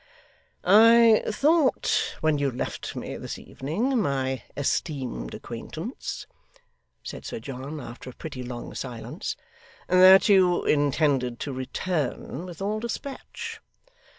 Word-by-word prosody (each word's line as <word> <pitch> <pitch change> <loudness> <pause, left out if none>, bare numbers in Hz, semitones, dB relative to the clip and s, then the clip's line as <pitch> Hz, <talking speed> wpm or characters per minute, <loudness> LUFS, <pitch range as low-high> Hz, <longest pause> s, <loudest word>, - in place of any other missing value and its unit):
'I 225 +3 +7
thought 295 +6 +2
when 155 -2 +2
you 140 -1 +1
left 125 - -5
me - - -5
this - - -6
evening, 225 - -1
my 135 -5 -1 0.2
esteemed 135 - -2
acquaintance,' - - -6 0.8
said - - -7
Sir - - -5
John 135 +5 -6
after 125 0 -9
a - - -10
pretty 140 -5 -7
long 120 -1 -6
silence, 120 -4 -5 0.5
'that 185 +2 +8
you 185 -4 +4
intended 140 -4 +2
to 140 - -3
return 150 +3 -3
with 175 +1 -7
all 210 +2 -1
despatch? 280 - -6
155 Hz, 115 wpm, -26 LUFS, 130-210 Hz, 0.8 s, that